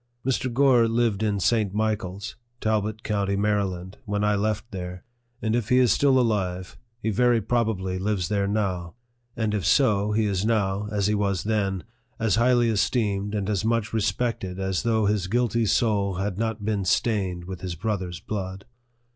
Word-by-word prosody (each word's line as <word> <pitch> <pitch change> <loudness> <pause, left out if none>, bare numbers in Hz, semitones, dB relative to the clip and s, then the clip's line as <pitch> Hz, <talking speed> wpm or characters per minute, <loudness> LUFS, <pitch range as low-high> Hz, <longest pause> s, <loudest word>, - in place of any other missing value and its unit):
Mr. 130 -1 0
Gore 125 -2 +4
lived 115 -3 +1
in 105 -2 0
St. 105 -1 +1
Michael's, 105 -2 -2 0.2
Talbot 110 0 -1
county, 100 -2 0
Maryland, 100 -2 -1
when 105 -1 -1
I 105 0 +3
left 110 +3 -1
there; 90 -2 -6 0.4
and 110 0 +1
if 120 -2 -1
he 125 - +4
is 125 -4 +5
still 135 +2 +4
alive, 95 -5 -1 0.2
he 110 - -1
very 120 +2 +3
probably 105 -5 -1
lives 95 -3 -1
there 100 0 0
now; 95 -4 -2 0.4
and 110 -2 0
if 105 -3 -1
so, 105 - +3
he 110 +1 +2
is 100 -2 0
now, 105 -2 0
as 100 -2 0
he 105 - +2
was 100 -3 0
then, 100 -4 -1 0.3
as 110 -1 +1
highly 120 0 +4
esteemed 105 -2 0
and 100 -2 -2
as 105 -3 0
much 115 -1 0
re 110 - +1
spected 100 -2 -1
as 95 -1 -1
though 110 -2 +1
his 100 -3 +1
guilty 115 +1 +1
soul 100 -4 +1
had 95 +1 -3
not 110 -2 -2
been 105 -2 0
stained 95 -3 0
with 95 -1 -7
his 90 -2 -4
brother's 90 -2 -3
blood. 95 -1 -5
105 Hz, 175 wpm, -25 LUFS, 95-110 Hz, 0.4 s, is